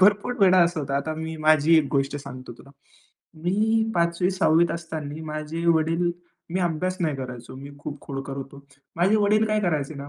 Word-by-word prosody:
भरपूर 205 +5 +4
वेळा 185 -1 +6
असा 170 -1 0
होतं. 140 -1 -3
आता 140 +3 -1
मी 160 0 -5
माझी 155 +1 +4
1 150 - +1
गोष्ट 135 0 0
सांगतो 130 -3 -9
तुला. 135 - -15 0.7
मी 220 +5 +1
5वी 170 +1 +1
6वीत 170 -3 +3
असताना 160 -2 -5
माझे 155 +2 -5
वडील 165 +1 +2 0.4
मी 185 +2 -1
अभ्यास 180 +1 -1
नाही 155 -5 0
करायचो. 125 -2 -7
मी 140 +2 -9
खूप 145 0 -7
खोडकर 135 0 -6
होतो. 140 +1 -9 0.3
माझे 190 +6 +3
वडील 210 +1 +3
काय 215 0 +1
करायचे 155 -6 -1
ना, 140 0 -8
160 Hz, 180 wpm, -24 LUFS, 145-180 Hz, 0.7 s, वेळा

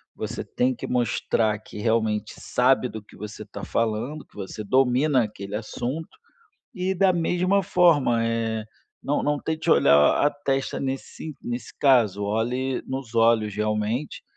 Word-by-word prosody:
você - - -5
tem 130 +1 0
que 125 - -7
mostrar 115 -3 0
que 110 - -12
realmente 110 -1 0
sabe 130 +1 +2
do 110 -3 -8
que - - -18
você 105 +1 -7
está 100 - -8
falando, 115 +7 -2
que - - -29
você 105 +2 -6
domina 130 +4 +3
aquele 100 -1 -6
assunto. 125 +8 -5 0.6
E, 190 -2 -1
da 190 +1 +4
mesma 180 +3 +1
forma, 150 -11 +3
eh, 115 -1 -1 0.4
não 145 - 0
não 145 0 +1
tente 160 +2 -3
olhar 75 - +5
a - - +5
testa 135 -2 -2
nesse 135 +3 -5
nesse 120 +1 -6
caso. 115 -8 +3
Olhe 125 +5 -1
nos 130 -3 -5
olhos, 115 -2 +3
realmente, 105 +6 -2
120 Hz, 145 wpm, -24 LUFS, 110-145 Hz, 0.6 s, olhar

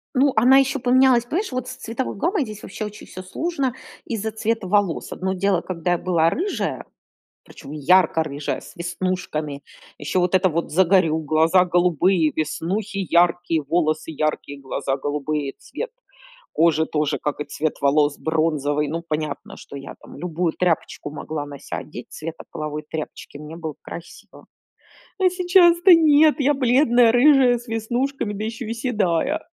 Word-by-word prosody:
Ну 270 +2 +4
она 255 +4 +6
ещё 270 +1 +2
поменялась, 250 -1 +4
понимаешь, 360 - -2
вот 255 -1 -3
с 255 - -6
цветовой 255 0 -4
гаммой 340 - 0
здесь 215 -3 -8
вообще 215 - -6
очень 210 0 -10
всё 185 - -9
сложно 275 - -2 0.3
из-за 220 -1 -3
цвета 220 -1 -2
волос. 200 -3 0
Одно 190 +1 -2
дело, 190 -1 +1
когда 175 -1 -3
я 175 - +1
была 165 -3 +2
рыжая, 375 - -3 0.6
причём 140 - -12
ярко 160 +2 +3
рыжая, 145 -1 -4
с - - -14
веснушками. 170 -5 -3 0.3
Ещё 170 +5 -1
вот 180 +1 0
это 185 0 +4
вот 165 +1 -2
загорю, 175 -2 +3
глаза 160 +4 +3
голубые, 175 -1 +2
веснухи 185 +7 -2
яркие, 170 -2 +2
волосы 155 +1 0
яркие, 150 -2 -3
глаза 135 0 -3
голубые- 145 0 -3
цвет, 475 - -6 0.6
кожа 160 -1 +3
тоже, 150 -1 -1
как 150 0 -3
и 150 - -3
цвет 150 +2 -3
волос, 145 +1 +2
бронзовый. 150 -2 0
Ну, 165 +2 -4
понятно, 155 0 -4
что - - -11
я, 140 0 -8
там, - - -13
любую 170 -1 -2
тряпочку 170 -4 -1
могла 150 -1 -5
на 140 -1 -10
ся - - -6
одеть 125 -5 -10
цвета 160 +1 -7
половой 150 0 -5
тряпочки, 155 -2 -7
мне 150 +2 -9
было 160 -3 -6
красиво. 170 +1 -11 0.7
Но 375 - +4
сейчас-то- 355 0 +5
нет, 310 -2 +5
я 285 +1 +3
бледная, 245 -3 +4
рыжая, 255 -1 +5
с 240 - -15
веснушками, 235 +2 -2
да 210 +2 -4
ещё 225 +2 -5
и 230 - -2
седая. 230 - 0
180 Hz, 160 wpm, -22 LUFS, 155-240 Hz, 0.7 s, она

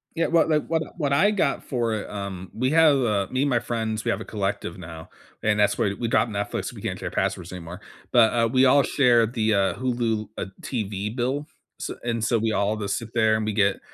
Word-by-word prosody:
Yeah, 165 - +1
what 165 -1 +3
like, 150 -1 +2
what 160 -1 0
I - - -11
what 145 -4 0
I 195 +9 +4
got 180 -9 0
for 120 -3 -1
it, 110 - -4
um 100 -2 -6
we 130 +3 0
have, 160 -3 +5
uh 105 -6 +1
me, 130 +2 +1
my 125 -4 +2
friends, 110 -2 -3
we 120 - +1
have - - -2
a - - -7
collective 100 -4 -3
now, 80 -2 -10 0.3
and 105 -1 +1
that's 105 -1 +2
why 100 - +1
we 115 - -2
got 120 - +3
Netflix 100 -2 -3
we - - -10
can't - - -4
share - - -4
passwords 90 0 -2
anymore, 90 +1 -8 0.3
but, 115 -3 +5
uh, 115 -1 +2
we 130 +1 +4
all 140 +2 +5
share 120 -5 +4
the, 110 -1 0
uh, 100 -1 +2
Hulu, 120 -4 -1
uh, - - -2 0.2
TV 105 -4 -3
bill. 135 +4 -1 0.3
S - - -4
and 115 -2 -2
so 115 +1 +2
we 110 0 0
all 105 0 +1
just 100 -2 -2
sit 115 -1 -8
there 110 -2 +4
and 110 - -2
we 110 - -1
get 100 -2 +2
115 Hz, 235 wpm, -24 LUFS, 105-130 Hz, 0.3 s, have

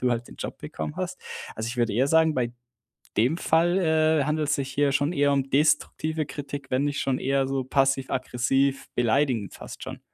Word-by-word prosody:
du 125 -1 +2
halt 120 0 -1
den - - -12
Job - - -6
bekommen 150 +1 -6
hast. 185 0 -4 0.3
Also, 110 +1 -4
ich 125 - -5
würde 120 -3 +1
eher 130 +6 +2
sagen, 160 0 +4
bei 120 -2 -1 0.7
dem 125 +9 +3
Fall, 175 +2 +2
äh, 160 -4 +3
handelt's 150 -1 0
sich 135 -1 -3
hier 145 +1 +2
schon 145 +4 +1
eher 145 -3 +3
um 135 -1 -1
destruktive 155 +2 +1
Kritik, 140 -1 -7
wenn 130 +3 +1
nicht 145 0 -1
schon 130 -1 0
eher 135 0 +1
so 135 -1 -1
passiv-aggressiv 135 0 +1
beleidigend 120 - +1
fast - - -10
schon. - - -7
140 Hz, 190 wpm, -26 LUFS, 130-150 Hz, 0.7 s, sagen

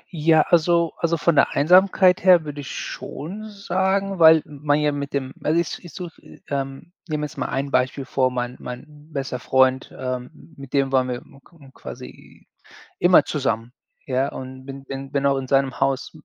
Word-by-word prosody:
Ja, 160 0 +4
also 170 0 +2
also, 170 0 0
von 170 +2 +2
der 140 - +4
Einsamkeit 185 +3 +4
her 180 -4 +6
würde 145 -1 -6
ich 135 - -8
schon 205 +9 -7
sagen, 195 -1 -1
weil 160 -1 +7
man 145 0 -1
ja 150 0 +2
mit 140 -1 -4
dem 130 -2 -3
also, 160 +3 +2
ich 170 - -3
ich 175 - -11
suche 175 +2 -9 0.3
ähm, 135 +4 -5
nehme 150 -2 -2
jetzt 150 - -9
mal - - -1
ein 140 +1 -2
Beispiel 130 +1 0
vor. 130 0 +1
Mein 125 0 -4
mein 125 +3 -8 0.3
bester 135 -3 -4
Freund, 130 0 +2
ähm, 130 +5 -6
mit 135 -2 -11
dem 135 -1 +1
waren 130 -1 +2
wir 125 - -2
m 135 - -19
k 170 - -23
m 135 -2 -16
k - - -22
quasi - - -11 0.5
immer - - +5
zusammen, 115 +2 -2 0.4
ja, 130 +1 0
und 130 0 -9
bin 135 0 -9
bin 135 0 -7
bin 140 -1 +1
auch 140 -1 +2
in 130 - -4
seinem 135 -1 +1
Haus 135 -1 0
140 Hz, 190 wpm, -22 LUFS, 130-165 Hz, 0.5 s, weil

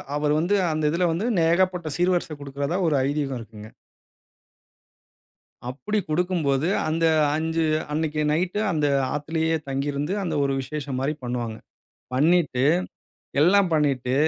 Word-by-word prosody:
அவர் 150 0 +1
வந்து, 180 +6 +1 0.2
அந்த 155 0 -2
இதில 175 +2 +1
வந்து 170 +7 -1 0.2
ஏகப்பட்ட 175 0 +2
சீர்வரிசை 175 -3 +1
குடுக்குறதா 140 +5 -3
ஒரு 150 - +2
ஐதீகம் 140 -2 -2
இருக்குங்க. 110 -1 -11 2.0
அப்படி 210 +11 -2
குடுக்கும்போது, 160 -3 0 0.2
அந்த 165 +1 0 0.3
5 160 +1 0 0.3
அன்னைக்கு 155 0 -1
நைட்டு 180 +6 0
அந்த 150 -3 +1 0.3
ஆத்துலயே 160 +2 0
தங்கி 135 +1 -2
இருந்து, 145 +6 -2
அந்த 165 -3 -2
ஒரு 140 - 0
விசேஷம் 140 -1 -5
மாரி 140 +3 0
பண்ணுவாங்க. 120 -2 -3 0.6
பண்ணீட்டு 150 -2 +2 0.8
எல்லாம் 190 +2 +4
பண்ணிட்டு, 135 -4 +1
155 Hz, 120 wpm, -24 LUFS, 140-170 Hz, 2.0 s, எல்லாம்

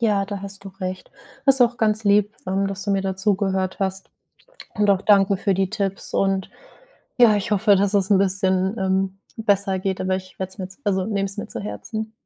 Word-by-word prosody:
Ja, 210 -4 +2
da 200 0 -6
hast 200 0 -5
du 195 - -6
recht. 185 0 -5 0.4
Das 270 -1 +7
ist - - -1
auch 240 0 +4
ganz 215 -1 +1
lieb, 205 +1 +3
ähm, 195 +1 0
dass 195 0 -4
du 205 - -1
mir 195 -1 +1
da 190 -1 -2
zugehört 190 -2 0
hast. 190 0 -2 0.6
Und 205 -1 +2
auch 195 -1 +2
danke 200 -1 +4
für 195 0 0
die 190 0 0
Tipps 195 -1 -3
und 195 -1 0 0.7
ja, 230 -3 +7
ich 205 +3 -3
hoffe, 205 0 +4
dass 200 +1 +1
es 195 0 +2
'n 195 - +5
bisschen, 190 +1 +1
ähm, 190 0 0 0.2
besser 200 -3 +1
geht, 190 0 -2
aber 185 0 0
ich 185 0 -10
werde 190 0 -4
es 190 - -13
mir 185 - -4
jetzt 190 +8 -12
also, 190 -2 +1
ich 220 - -5
nehme 200 -1 0
es 195 +2 -8
mir - - -4
zu - - -5
Herzen. 220 +1 -5
195 Hz, 230 wpm, -22 LUFS, 190-205 Hz, 0.7 s, Das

